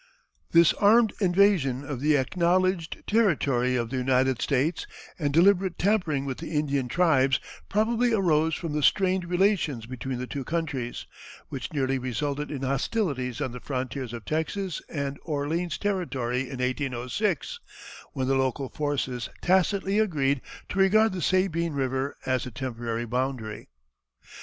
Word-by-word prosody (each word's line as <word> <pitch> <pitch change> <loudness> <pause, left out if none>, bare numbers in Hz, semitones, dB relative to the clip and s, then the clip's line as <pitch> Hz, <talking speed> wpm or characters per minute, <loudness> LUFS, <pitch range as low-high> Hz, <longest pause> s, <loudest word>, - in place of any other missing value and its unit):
This 170 -1 +6
armed 220 +1 +4
invasion 175 -8 +3
of 135 -3 -5
the 150 0 +4
acknowledged 175 +4 0
territory 140 - +2
of 120 -1 -2
the 130 - -2
United 130 0 +2
States 145 +5 0 0.3
and 145 -3 0
deliberate 185 +3 +4
tampering 175 -9 +1
with 135 -2 -4
the 165 +1 -6
Indian 140 -3 0
tribes 135 -4 +3 0.3
probably 230 +3 +2
arose 160 -7 +2
from 165 -4 -4
the 150 - 0
strained 185 +4 +2
relations 175 - +1
between 130 +1 -5
the 125 - -4
two 140 +1 -5
countries, 150 -7 -3 0.4
which 130 -3 -5
nearly 135 -3 0
resulted 140 +4 -3
in 135 -3 -5
hostilities 135 - -1
on 130 - -1
the 125 - -7
frontiers 130 -1 -4
of 115 -3 -7
Texas 160 - -2
and 140 -2 -3
Orleans 160 +3 -2
territory 135 - -2
in 135 - -6
1806, 130 - -2 0.5
when 130 -3 -1
the 135 - +2
local 130 0 0
forces 140 -4 -2
tacitly 190 +2 +2
agreed 145 -10 +1 0.3
to 195 - -3
regard 215 +3 +5
the 185 - -4
Sabine 170 -2 +1
River 135 0 -2
as 130 -1 0
the - - -5
temporary 120 -2 -4
boundary. 125 - -3
145 Hz, 140 wpm, -26 LUFS, 130-180 Hz, 0.5 s, This